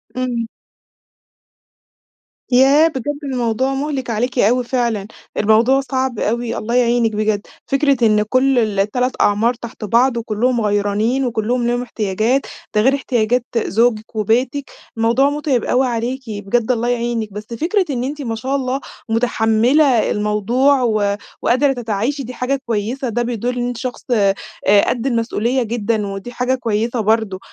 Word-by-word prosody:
إمم. 245 -3 -2 2.0
ياه! 275 +5 +6
بجد 290 0 -4
الموضوع 260 0 -1
مُهلِك 270 -3 -3
عليكِ 245 +3 -1
أوي 245 +4 +3
فعلًا، 235 -5 -1 0.3
الموضوع 225 +6 +4
صعب 260 -2 -2
أوي، 235 +1 -1
الله 235 +3 -2
يعينِك 240 -2 +3
بجد، 210 -1 -1 0.2
فكرة 275 -1 +2
إن 210 0 +3
كل 255 +3 +2 0.2
3 250 +6 0
أعمار 220 +4 +3
تحت 235 -2 -10
بعض، 240 +3 +3
وكلّهم 230 +2 0
غيرانين، 210 +5 +1
وكلّهم 235 +1 -1
ليهم 245 0 0
احتياجات، 225 +3 0 0.3
ده 210 - +4
غير 265 +4 +4
احتياجات 245 -2 0
زوجك 225 0 0
وبيتك، 245 +7 0 0.3
الموضوع 235 +5 +3
متعب 290 -5 -1
أوي 255 +1 +2
عليكِ، 245 +3 -2
بجد 220 +3 -1
الله 240 0 0
يعينِك، 235 -3 -1
بس 210 +1 -7
فكرة 340 - 0
إن 250 -3 -2
أنتِ 290 +2 -4
ما 230 -4 -3
شاء 265 +5 -2
الله 265 0 -1 0.3
متحمِّلة 235 +3 +2
الموضوع 230 +7 +2
و 210 -3 +1 0.2
وقادرة 270 +2 +2
تتعايشي، 240 +4 -2
دي 250 +2 -7
حاجة 265 +2 -2
كويِّسة، 235 +4 -2
ده 240 +2 -1
بيدل 245 +1 -2
إن 245 0 -1
أنتِ 245 -1 -4
شخص 255 -1 -5
آآ، 200 -1 +2
قدّ 250 +2 -1
المسؤولية 235 +1 0
جدًا، 220 -2 -1
ودي 195 +5 -6
حاجة 250 +1 0
كويسة 230 0 -1
برضه، 215 -3 +1
240 Hz, 145 wpm, -18 LUFS, 220-260 Hz, 2.0 s, ياه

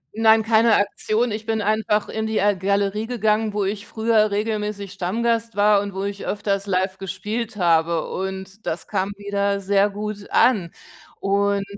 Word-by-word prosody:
Nein, 220 0 +5
keine 225 0 +4
Aktion. 215 +3 0
Ich 215 +1 -5
bin 220 -2 0
einfach 215 0 +1
in 220 0 -3
die, 220 0 -1
äh, 205 0 +3
Galerie 200 +3 0
gegangen, 220 -2 +1
wo 205 0 -1
ich 205 +2 -4
früher 220 -1 +2
regelmäßig 210 -1 -2
Stammgast 230 +4 -1
war 205 0 +4
und 200 -1 -6
wo 195 - -3
ich 200 0 -4
öfters 200 -1 -1
live 190 0 -1
gespielt 210 +4 -4
habe. 165 -3 +2
Und 190 +2 -5
das 160 - -3
kam 195 -1 -1
wieder 200 0 -1
sehr 200 +1 +2
gut 205 0 -6
an. 205 -9 +3 0.5
Und 200 0 +1
205 Hz, 165 wpm, -22 LUFS, 195-220 Hz, 0.5 s, Nein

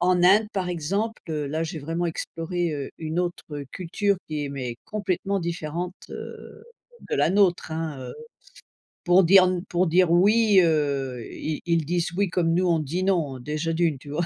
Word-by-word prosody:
en 180 0 +3
Inde 205 +4 +6
par 185 -2 -1
exemple, 195 +7 -2
heu, 150 -2 -2
là, 155 +3 -2
j'ai 160 0 -5
vraiment 165 +4 -2
exploré, 165 +1 -3
heu, 140 -2 -5
une 160 +1 -3
autre 175 -1 -3 0.3
culture 200 +3 0
qui 150 -1 -2
est, 140 - -4
mais, 125 -4 -4
complètement 200 -1 -1
différente, 170 +1 -3 0.2
heu, 445 - -9 0.5
de - - +1
la - - +3
nôtre, 185 -4 +2
hein, 160 -3 -3
heu, - - -8 0.9
pour 180 +2 +6
dire 185 +2 +7
n 180 -1 -1
pour 180 +1 +2
dire: 175 +1 +4
«Oui», 205 +3 +5
heu, 140 -6 0
ils 155 -1 -4
ils 165 -3 +1
disent: 175 0 -1
«Oui» 200 -2 +2
comme 165 -2 +1
nous 185 +1 +2
on 165 -2 +3
dit: 160 +5 -2
«Non», 165 -9 0
déjà 155 +5 -2
d'une, 165 -3 +1
tu 145 - -12
vois? 165 +4 -1
170 Hz, 185 wpm, -25 LUFS, 155-185 Hz, 0.9 s, dire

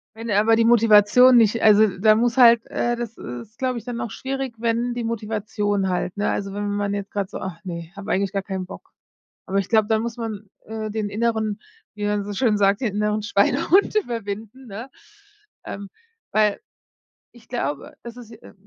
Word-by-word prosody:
Wenn 230 +1 -7
aber 215 +3 +4
die 230 - +3
Motivation 230 +2 +6
nicht 225 0 +3
also, 215 0 +6
da 215 +3 +5
muss 235 +2 +1
halt 235 -2 +7
äh, 240 0 -1
das 235 -1 -6
ist, 125 - -9
glaube 255 -2 -1
ich, 230 - -17
dann 240 -2 -5
auch 225 - -4
schwierig, 270 -1 -4
wenn 235 +1 0
die 240 0 -4
Motivation 210 -3 -2
halt, 180 0 -2
ne 205 - 0
also, 195 -1 -3
wenn 205 +1 -3
wenn 205 - -2
man 205 0 -1
jetzt 200 -1 -4
grad 200 -2 -3
so: - - -6
„Ah, 185 -3 -6
ne, 170 -2 -7
habe 200 +1 -6
eigentlich 195 0 0
gar 195 -2 -2
keinen 190 -2 -5
Bock.“ 195 - -12 0.6
Aber 195 - -1
ich 195 - -1
glaube, 220 -2 +3
dann 220 0 +1
muss 235 0 -5
man, 215 -3 -6 0.2
äh, 220 0 -5
den 210 -1 -3
inneren 220 -1 -1 0.3
wie 210 -1 -5
man 205 -1 -1
so 205 - -5
schön 210 0 +1
sagt, 200 0 +3
den 225 -6 -2
inneren 210 0 0
Schweinehund 255 - +2
überwinden, 230 - -4
ne? 225 +5 -8 0.7
Ähm, 200 0 -7 0.4
weil 210 -1 +2 0.7
ich 230 -2 -19
glaube, 145 - -4
es 235 0 -9
ist, 230 -2 -12
äh 225 - -14
215 Hz, 200 wpm, -22 LUFS, 200-235 Hz, 0.7 s, halt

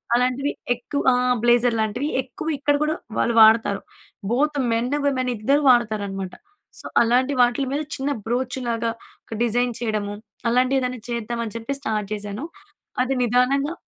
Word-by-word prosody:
అలాంటివి 255 +4 +1 0.2
ఎక్కువ 265 +4 -4
ఆ! - - +3 0.3
బ్లేజర్ 240 -1 +4
లాంటివి 245 +7 -1
ఎక్కువ 260 +5 -8
ఇక్కడ 290 +1 +2
కూడా 310 +1 0 0.2
వాళ్ళు 235 0 +1
వాడతారు. 220 -2 +5 0.5
బోత్ 290 +3 +1
మెన్ 235 +3 -1 0.2
విమెన్ 255 -2 0
ఇద్దరూ 280 +8 +2
వాడుతారనమాట. 205 -5 0 0.5
సో - - -15 0.2
అలాంటి 250 +4 +2
వాటిల 245 +3 +2
మీద 290 - 0 0.2
చిన్న 275 +2 -1 0.2
బ్రోచ్‌లాగా 240 -1 -1 0.3
ఒక 220 - -7
డిజైన్ 240 +1 +1
చేయడము 210 -3 -2 0.4
అలాంటివేదైనా 255 0 +1
చేద్దాం 235 0 -3
అని 215 - -8
చెప్పి 230 +5 -4
స్టార్ట్ 215 -5 -2
జేశాను. 205 +5 -5 0.6
అది 265 +1 -1
నిదానంగా 265 +6 +2
245 Hz, 140 wpm, -23 LUFS, 225-265 Hz, 0.6 s, వాడతారు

